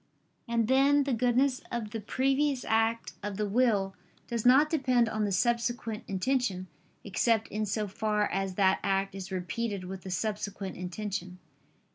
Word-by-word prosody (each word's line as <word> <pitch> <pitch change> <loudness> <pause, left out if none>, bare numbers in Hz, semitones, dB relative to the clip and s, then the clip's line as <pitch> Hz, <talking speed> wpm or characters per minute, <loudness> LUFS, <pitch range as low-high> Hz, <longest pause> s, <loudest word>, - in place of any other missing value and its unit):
And 230 -2 +1
then 275 +3 +4
the 275 -1 -1
goodness 250 +3 +2
of 230 -3 -3
the 225 - -3
previous 270 +4 0
act 225 +1 +1
of 205 -1 -4
the 210 -1 0
will 205 -3 +2 0.3
does 235 -1 0
not 270 +5 +7
depend 255 -6 +2
on 215 -1 -1
the 200 - -1
subsequent 235 +1 0
intention, 195 -1 0 0.4
except 220 +2 +1
in 215 0 -2
so 210 +1 -1
far 210 +1 0
as 195 -1 -2
that 190 -1 +3
act 195 0 0
is 190 -1 -7
repeated 190 +2 -3
with 190 +1 -7
the 190 - -8
subsequent 200 0 -3
intention. 185 0 -5
215 Hz, 155 wpm, -29 LUFS, 195-245 Hz, 0.4 s, not